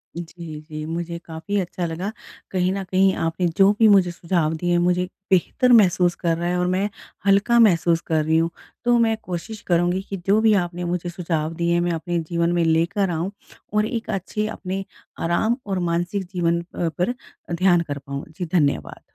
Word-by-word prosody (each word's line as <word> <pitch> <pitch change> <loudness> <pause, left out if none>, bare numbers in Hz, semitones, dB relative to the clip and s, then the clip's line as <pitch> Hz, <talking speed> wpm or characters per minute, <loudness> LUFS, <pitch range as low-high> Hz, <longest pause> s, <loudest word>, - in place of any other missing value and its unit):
जी, 170 -2 -7
जी। 155 0 -7
मुझे 170 +1 -4
काफ़ी 160 +5 -4
अच्छा 180 -1 -3
लगा 175 +6 -3 0.4
कहीं 185 -1 +1
न 195 - -3
कहीं 190 +1 +3
आपने 170 +2 0
जो 195 0 +6
भी 225 - +7
मुझे 190 -4 +5
सुझाव 170 -2 0
दिए। 175 +1 +1
मुझे 180 +1 +2 0.3
बेहतर 195 +7 +3
महसूस 180 -5 +5
कर 165 -2 0
रहा 175 - -2
है 180 - 0
और 180 - +1
मैं 190 +3 0 0.4
हल्का 200 +4 +4
महसूस 170 -6 +4
कर 155 -1 +2
रही 160 +1 +3
हूँ 165 +1 +2 0.4
तो 240 0 +4
मैं 225 -1 +3
कोशिश 195 +5 -6
करूँगी 175 +1 +2
कि 195 - -3
जो 205 +2 +5
भी 220 -1 +5
आपने 175 0 -6
मुझे 175 0 -2
सुझाव 165 -3 -2
दिए 170 +1 0
हैं 175 - +2
मैं 175 0 0
अपने 170 +1 -2
जीवन 170 0 +1
में 175 -1 +2
लेकर 165 +5 +2
आऊँ 170 +3 -2 0.4
और 210 0 +3
एक 230 -1 -4
अच्छे 205 +3 -2
अपने 195 -2 -4 0.4
आराम 220 +8 +1
और 195 -2 -1
मानसिक 175 +4 -1
जीवन 170 -1 +1
प 170 - 0
पर 180 +7 +1 0.4
ध्यान 175 0 +4
कर 145 -4 -4
पाऊँ। 140 0 -6
जी, 180 - -2
धन्यवाद। 145 -6 0
175 Hz, 190 wpm, -22 LUFS, 170-195 Hz, 0.4 s, भी